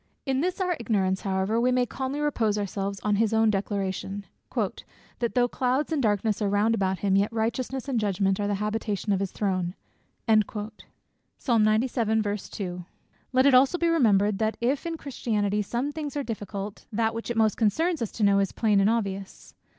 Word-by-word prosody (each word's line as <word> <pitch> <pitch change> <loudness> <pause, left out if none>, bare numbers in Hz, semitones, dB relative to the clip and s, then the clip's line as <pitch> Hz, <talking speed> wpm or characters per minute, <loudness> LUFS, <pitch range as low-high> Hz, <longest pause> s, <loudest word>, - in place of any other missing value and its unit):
In 265 -1 0
this 365 +4 -1
our 365 -2 +1
ignorance 195 -4 0
however, 195 +3 0
we 250 +1 +3
may 250 0 +2
calmly 265 +3 -4
repose 230 -8 +1
ourselves 200 -1 -3
on 210 -1 +1
his 225 0 +2
own 220 -1 +4
declaration, 200 0 -3 0.3
"That - - -1 0.5
though 245 -1 +4
clouds 260 +5 0
and 305 -3 +1
darkness 210 -1 +1
are 205 - +1
round 205 +3 +2
about 190 -3 0
him, 195 -1 +2
yet 200 +3 +2
righteousness 235 +4 -2
and 255 -4 0
judgment 195 -2 +1
are 205 - 0
the 205 - 0
habitation 210 0 -1
of 190 - +1
his 195 -1 -2
throne." 185 -3 -1 0.5
Let 215 0 +1 2.7
it 280 - +6
also 265 +7 +5
be 340 -1 +1
remembered, 210 -10 +3
that 220 0 0
if 265 +7 0
in 330 -1 -3
Christianity 210 -7 -1
some 240 +7 -2
things 295 -1 -5
are 285 - -1
difficult, 205 -3 -6
that 225 +1 0
which 230 +1 -5
it 240 - -2
most 220 -2 +3
concerns 320 - +1
us 230 - -2
to 220 - -2
know, 200 -1 +5
is 195 -1 +1
plain 210 -3 +2
and 195 +2 +4
obvious. 195 -4 -3
215 Hz, 175 wpm, -26 LUFS, 200-250 Hz, 2.7 s, it